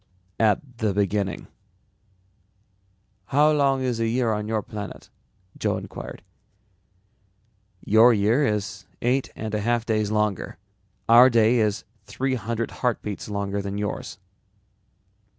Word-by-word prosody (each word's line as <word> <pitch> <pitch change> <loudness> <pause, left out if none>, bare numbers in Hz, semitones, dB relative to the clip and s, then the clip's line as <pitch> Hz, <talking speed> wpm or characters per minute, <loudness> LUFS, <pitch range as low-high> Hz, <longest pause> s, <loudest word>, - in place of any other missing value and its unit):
"At 115 +3 +1
the 105 -3 0
beginning." 100 -1 -1 1.8
"How 150 +3 +3
long 140 -3 +2
is 125 -3 -1
a 115 - +1
year 115 -1 +1
on 105 0 -3
your 110 -1 -1
planet?" 105 -2 -8 0.5
Joe - - 0
inquired. - - -8 1.6
"Your 110 +4 +6
year 110 +6 +2
is 105 -5 -2 0.2
eight 125 +3 +1
and 110 0 -5
a 105 - 0
half 120 +1 0
days 110 -3 0
longer. 105 -2 -1 0.5
Our 120 +3 +8
day 115 0 +4
is 105 -2 0 0.2
three 130 +4 -2
hundred 115 -1 -3
heartbeats 110 -5 -3
longer 100 0 -2
than 100 0 -4
yours." 105 0 -4
110 Hz, 120 wpm, -24 LUFS, 105-120 Hz, 1.8 s, Our